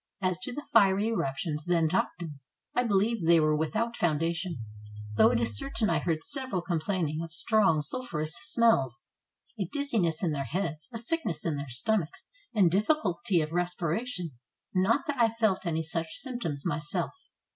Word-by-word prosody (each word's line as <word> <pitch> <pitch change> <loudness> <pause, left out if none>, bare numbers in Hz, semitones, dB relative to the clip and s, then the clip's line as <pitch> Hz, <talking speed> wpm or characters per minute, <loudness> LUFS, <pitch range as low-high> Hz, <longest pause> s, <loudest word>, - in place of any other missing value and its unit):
As 185 -2 0
to 250 - -5
the 290 +4 -6
fiery 200 0 +5
eruptions 150 -5 -2
then 170 -2 +3
talked 175 +1 -1
of, 165 - -5 0.4
I 245 - +2
believe 215 -1 +1
they 170 0 +7
are 155 -1 +3
without 220 +10 -1
foundation, 170 +1 0 0.6
though - - +6
it - - +2
is 115 -2 +1
certain 220 - 0
I - - +2
heard 165 -2 -1
several 260 - -1
complaining 165 -2 -1
of 165 -1 -6
strong 175 -3 +3
sulphureous 160 - -2
smells, 140 - +2 0.5
a 195 - 0
dizziness 205 - 0
in 170 - +2
their 140 -2 -2
heads, 165 - -3
a 230 - -5
sickness 235 - -2
in 165 -3 0
their 140 -1 -5
stomachs, 165 - 0 0.3
and 190 -6 +4
difficulty 205 - +2
of 155 0 -3
respiration, 175 +2 -2 0.4
not 215 +9 +2
that 280 -5 -1
I 230 - +5
felt 220 -5 0
any 160 -1 0
such 165 0 -3
symptoms 235 - -4
myself. 155 +4 -1
175 Hz, 165 wpm, -29 LUFS, 160-225 Hz, 0.6 s, they